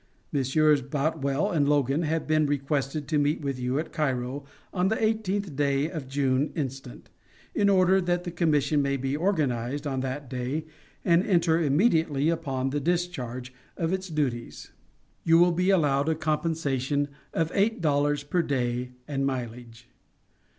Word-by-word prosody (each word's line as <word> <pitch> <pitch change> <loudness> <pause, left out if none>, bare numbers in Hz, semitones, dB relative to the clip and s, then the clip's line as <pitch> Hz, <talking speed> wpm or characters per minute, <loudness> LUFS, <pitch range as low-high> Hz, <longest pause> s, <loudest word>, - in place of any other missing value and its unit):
Messrs. 145 +2 +3
Boutwell 140 +1 -1
and 145 -4 +2
Logan 145 +1 +2
have 160 0 -1
been 155 -1 +2
requested 140 +1 -1
to 155 -3 +1
meet 145 +2 +1
with 140 -3 -3
you 125 +2 -1
at 155 - -3
Cairo 135 -2 -1 0.3
on 180 0 +1
the 220 +3 0
eighteenth 205 -6 -1
day 140 +2 +1
of 155 -6 -6
June 135 +1 +1
instant, 135 - -6 0.4
in 200 -1 +3
order 190 0 +4
that 175 0 0
the 175 - -5
commission 150 -4 +2
may 140 0 0
be 135 +1 -2
organized 145 - -1
on 135 -2 -1
that 135 +2 -4
day 130 +4 -3 0.4
and 170 +1 +4
enter 170 -4 +2
immediately 160 -2 +2
upon 135 -6 -1
the 145 - 0
discharge 130 -7 -2 0.2
of 165 +1 -1
its 190 0 -3
duties. 135 -7 -3 0.5
You 165 0 +5
will 175 +1 +5
be 180 +2 +1
allowed 145 -6 +3
a 160 - +2
compensation 150 -3 -1 0.2
of 165 0 -1
eight 210 +3 +2
dollars 145 -2 +1
per 160 +5 0
day 125 -4 -2
and 140 -2 -2
mileage. 120 -2 -5
145 Hz, 155 wpm, -27 LUFS, 135-165 Hz, 0.5 s, You